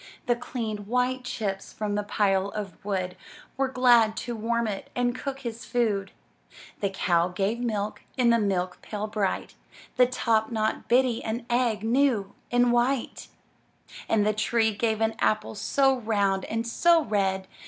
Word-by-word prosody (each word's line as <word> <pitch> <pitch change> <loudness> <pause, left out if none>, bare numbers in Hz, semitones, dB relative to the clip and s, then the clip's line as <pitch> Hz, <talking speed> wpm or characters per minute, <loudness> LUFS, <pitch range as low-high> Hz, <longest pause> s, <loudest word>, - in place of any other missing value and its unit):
The 240 -3 +2
clean, 235 -3 -4
white 250 +2 0
chips 195 -5 -3
from 210 -1 -3
the 205 - 0
pile 195 -2 +1
of 200 -4 -7
wood 185 -3 -2 0.4
Were 270 0 +1
glad 240 -4 +4
to 240 -1 -4
warm 235 +1 0
it 200 -2 -5
and 245 0 +1
cook 270 +1 -5
his 235 -2 -6
food. 210 -5 0 0.7
The 200 - 0
cow 175 -3 +1
gave 195 +5 -1
milk 215 -4 -2 0.2
in 245 -2 +4
the 235 - +4
milk 185 -3 -1
pail 210 -1 -4
bright; 210 -3 -2 0.4
The 250 0 +6
top 225 -3 +1
knot 220 -1 -1
Biddy 245 -1 +2
an 230 +2 -3
egg, 235 -4 +1
new 230 -4 +2 0.2
and 245 0 +4
white; 240 +1 0 0.8
And 210 -2 +3
the 215 - +2
tree 220 +1 +1
gave 220 0 0
an 225 0 +2
apple 215 - +1
so 270 +5 +2
round 200 -4 0
and 225 +1 -2
so 335 +7 +4
red. 195 -4 0
220 Hz, 160 wpm, -26 LUFS, 205-245 Hz, 0.8 s, The